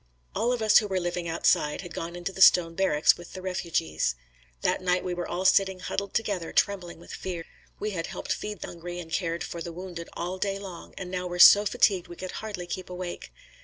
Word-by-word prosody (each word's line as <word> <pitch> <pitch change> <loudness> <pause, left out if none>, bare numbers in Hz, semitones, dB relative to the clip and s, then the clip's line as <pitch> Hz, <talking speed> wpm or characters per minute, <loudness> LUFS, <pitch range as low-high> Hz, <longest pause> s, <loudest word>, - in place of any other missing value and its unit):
All 230 +4 +1
of 245 -3 -1
us 215 - +7
who 210 - -3
were 190 -2 0
living 175 -1 -3
outside, 155 -2 +2
had 175 -3 -9
gone 170 +1 -5
into 175 +2 -4
the 190 - -7
stone 170 -3 +7
barracks 165 -4 +3
with 175 - -12
the 185 - -7
refugees. 165 - -1 0.5
That - - +1
night 180 0 +1
we 180 - -2
were 175 0 -4
all 185 +2 -3
sitting 190 0 +4
huddled 200 +2 -4
together 200 -6 -1
trembling 185 -4 0
with - - -11
fear. 175 -3 -5 0.3
We 210 - -2
had 165 -4 -3
helped - - -3
feed 210 -2 -6
the - - -4
hungry 175 +1 -7
and 165 -2 -9
cared 170 -1 -1
for 170 - -6
the 170 - -5
wounded 175 -1 -7
all 180 +2 -4
day 195 0 -1
long 190 -4 -9
and 180 -2 -6
now 180 -1 -2
were 175 0 -4
so 205 +4 +9
fatigued 195 -6 +2
we 175 - -9
could 185 +1 -6
hardly 205 -5 -5
keep 185 +1 -6
awake. 180 -1 -6
180 Hz, 225 wpm, -27 LUFS, 170-195 Hz, 0.5 s, so